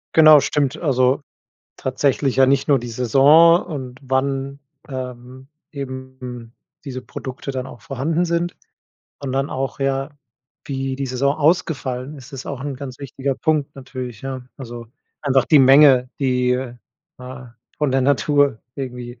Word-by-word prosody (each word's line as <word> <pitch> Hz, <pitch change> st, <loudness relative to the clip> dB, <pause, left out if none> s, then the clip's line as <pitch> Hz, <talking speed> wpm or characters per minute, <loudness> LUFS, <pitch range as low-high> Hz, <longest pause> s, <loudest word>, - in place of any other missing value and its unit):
Genau, 155 Hz, -2 st, +9 dB
stimmt. 140 Hz, 0 st, 0 dB
Also 135 Hz, -1 st, +2 dB, 0.5 s
tatsächlich 135 Hz, 0 st, 0 dB
ja 135 Hz, 0 st, +6 dB
nicht 135 Hz, +2 st, +2 dB
nur 140 Hz, -, +5 dB
die 120 Hz, -1 st, -6 dB
Saison 140 Hz, +8 st, +5 dB
und 130 Hz, -5 st, -6 dB
wann, 135 Hz, +1 st, -1 dB, 0.3 s
ähm, 130 Hz, 0 st, -8 dB, 0.2 s
eben 130 Hz, -4 st, -8 dB, 0.3 s
diese 130 Hz, -2 st, -5 dB
Produkte 130 Hz, +2 st, -8 dB
dann 130 Hz, -2 st, -3 dB
auch 125 Hz, -, -11 dB
vorhanden 155 Hz, +4 st, -1 dB
sind, 170 Hz, +1 st, -1 dB, 0.7 s
sondern 135 Hz, +1 st, -2 dB
auch, 135 Hz, +1 st, -3 dB
ja, 135 Hz, +1 st, -1 dB, 0.5 s
wie 135 Hz, -2 st, -3 dB
die 135 Hz, 0 st, -3 dB
Saison 135 Hz, +3 st, 0 dB
ausgefallen 145 Hz, -4 st, 0 dB
ist, 130 Hz, 0 st, -13 dB
ist 135 Hz, -, -7 dB
auch 135 Hz, -2 st, -5 dB
'n 140 Hz, -1 st, -4 dB
ganz 130 Hz, -1 st, -8 dB
wichtiger 135 Hz, 0 st, -3 dB
Punkt 155 Hz, -1 st, 0 dB
natürlich, 130 Hz, -4 st, -7 dB
ja, 130 Hz, -2 st, -6 dB
also, 120 Hz, -3 st, -8 dB, 0.3 s
einfach 135 Hz, -3 st, +2 dB
die 150 Hz, -, +6 dB
Menge, 135 Hz, -1 st, +6 dB
die, 125 Hz, -2 st, +2 dB, 0.7 s
ne, 125 Hz, -2 st, -10 dB, 0.2 s
von 150 Hz, -2 st, 0 dB
der 135 Hz, +1 st, +2 dB
Natur 145 Hz, -1 st, +2 dB, 0.2 s
irgendwie 125 Hz, -3 st, -6 dB
135 Hz, 140 wpm, -21 LUFS, 130-140 Hz, 0.7 s, Genau